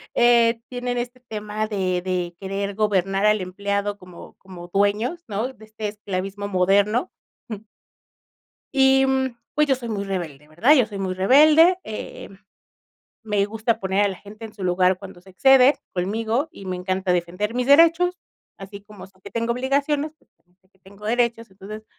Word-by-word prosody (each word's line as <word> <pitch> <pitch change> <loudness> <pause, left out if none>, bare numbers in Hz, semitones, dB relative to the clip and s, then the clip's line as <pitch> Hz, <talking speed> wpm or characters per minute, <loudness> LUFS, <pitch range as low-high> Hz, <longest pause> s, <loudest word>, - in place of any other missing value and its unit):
Eh, 235 -1 +4
tienen 245 -1 -3
este 245 +1 -5
tema 215 -2 -5
de 185 -4 -1
de 180 -2 -3
querer 200 +1 -4
gobernar 195 -1 +1
al 210 -1 +3
empleado 200 +2 -3
como 180 -2 -13
como 180 -2 -12
dueños, 205 - 0
¿no? 225 +5 -3
De 220 - -16
este 215 0 -6
esclavismo 200 -1 -5
moderno, 200 - +2 0.4
jum 215 -1 -7 1.1
y, 270 0 +4
mm, 265 -2 -1 0.2
pues, 300 0 +2
yo 270 - +3
soy 240 -2 -7
muy 205 -2 -2
rebelde, 165 -7 -5
¿verdad? 210 - +3
Yo 255 -6 +4
soy 205 -3 -8
muy 190 -1 -2
rebelde, 305 - +5
eh, 215 -1 -8 0.9
me 210 -2 0
gusta 225 +1 -1
poner 190 +1 +1
a 205 - +2
la 190 - -5
gente 215 +4 -12
en 220 - -9
su 200 - -10
lugar 180 +1 +2
cuando 190 -2 -11
se 190 +1 -17
excede, 265 +6 +5 0.2
conmigo, 220 - -1
y 195 - -11
me 185 -1 -3
encanta 185 0 -1
defender 180 +5 -2
mis 250 0 -1
derechos, 335 +5 +5 0.4
así 200 +1 -10
como 205 -2 -13
sé 190 -1 -26
que - - -10
tengo 230 0 -1
obligaciones, 280 +4 -1
pues, - - -34
también 180 0 -38
sé 185 - -35
que 190 - -35
tengo 200 +2 -13
derechos, 230 -1 0
entonces 205 +3 -10
210 Hz, 175 wpm, -22 LUFS, 190-245 Hz, 1.1 s, rebelde